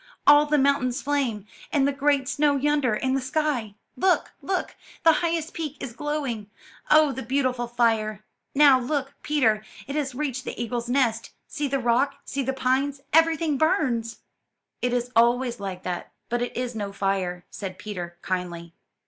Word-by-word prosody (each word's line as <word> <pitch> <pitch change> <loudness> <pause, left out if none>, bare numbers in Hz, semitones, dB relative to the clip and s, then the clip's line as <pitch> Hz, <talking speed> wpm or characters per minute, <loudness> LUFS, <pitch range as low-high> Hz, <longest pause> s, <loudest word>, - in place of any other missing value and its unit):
All 295 +1 +7
the 300 0 +3
mountains 270 -3 +2
flame, 265 -8 -1 0.3
and 280 -2 +3
the - - +2
great 280 -1 +1
snow 290 +1 +2
yonder, 285 -4 +2
and 260 +4 0
the 270 - 0
sky. 255 -6 -1 0.2
Look, 370 0 +2
look! 375 -1 -2 0.3
the 330 - +8
highest 335 -1 -1
peak 305 -4 -4
is 255 -4 -6
glowing. 270 -7 -3 0.4
Oh, 305 -1 +6
the 265 0 -5
beautiful 255 -1 0
fire! 225 -3 +1 0.3
Now 280 -2 +7
look, 275 +2 -2
Peter, 225 -8 +2 0.2
it 275 - -5
has 280 -4 -2
reached 265 -3 -2
the - - -6
eagle's 235 0 -3
nest. 245 -4 +1 0.2
See 295 -2 -2
the 275 0 0
rock! 250 +3 +2
see 280 - -2
the 265 0 -1
pines! 270 +2 0
everything 320 -2 +3
burns!" 235 -8 +1 0.6
'It 250 - +1
is 245 0 -1
always 240 +1 +3
like 190 -2 -5
that, 180 -1 -4 0.2
but 240 +1 0
it 245 - -3
is 250 -1 -2
no 205 -3 -4
fire," 190 -3 -2
said 185 -2 -6
Peter 180 -4 -6
kindly. 175 -2 -4
255 Hz, 165 wpm, -25 LUFS, 225-290 Hz, 0.6 s, the